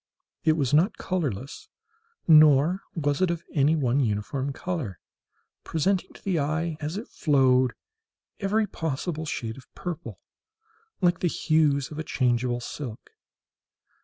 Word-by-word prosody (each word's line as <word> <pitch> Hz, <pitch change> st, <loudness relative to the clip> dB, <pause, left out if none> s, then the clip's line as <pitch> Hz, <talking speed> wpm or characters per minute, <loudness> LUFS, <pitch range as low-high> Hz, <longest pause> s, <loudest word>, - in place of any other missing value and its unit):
It 160 Hz, -, +4 dB
was 145 Hz, -4 st, 0 dB
not 170 Hz, +8 st, +3 dB
colourless, 140 Hz, -, -3 dB, 0.6 s
nor 155 Hz, +3 st, +6 dB
was 145 Hz, -1 st, 0 dB
it 185 Hz, -, +3 dB
of 170 Hz, -1 st, -2 dB
any 150 Hz, +1 st, +3 dB
one 135 Hz, -3 st, +1 dB
uniform 130 Hz, +4 st, -1 dB
colour—presenting 165 Hz, -, -4 dB
to -, -, -16 dB
the 185 Hz, -4 st, 0 dB
eye, 155 Hz, +3 st, -1 dB
as 155 Hz, +5 st, -4 dB
it 220 Hz, -, -6 dB
flowed, 130 Hz, -4 st, +3 dB, 0.7 s
every 215 Hz, +2 st, +1 dB
possible 160 Hz, -2 st, -3 dB
shade 115 Hz, -5 st, -4 dB
of 130 Hz, -, -19 dB
purple; 175 Hz, -3 st, -6 dB, 0.8 s
like 175 Hz, -1 st, +3 dB
the 180 Hz, -, +1 dB
hues 150 Hz, -4 st, +1 dB
of 150 Hz, -, -6 dB
a -, -, -2 dB
changeable 120 Hz, -3 st, 0 dB
silk. 120 Hz, -2 st, -7 dB
150 Hz, 130 wpm, -26 LUFS, 130-170 Hz, 0.8 s, nor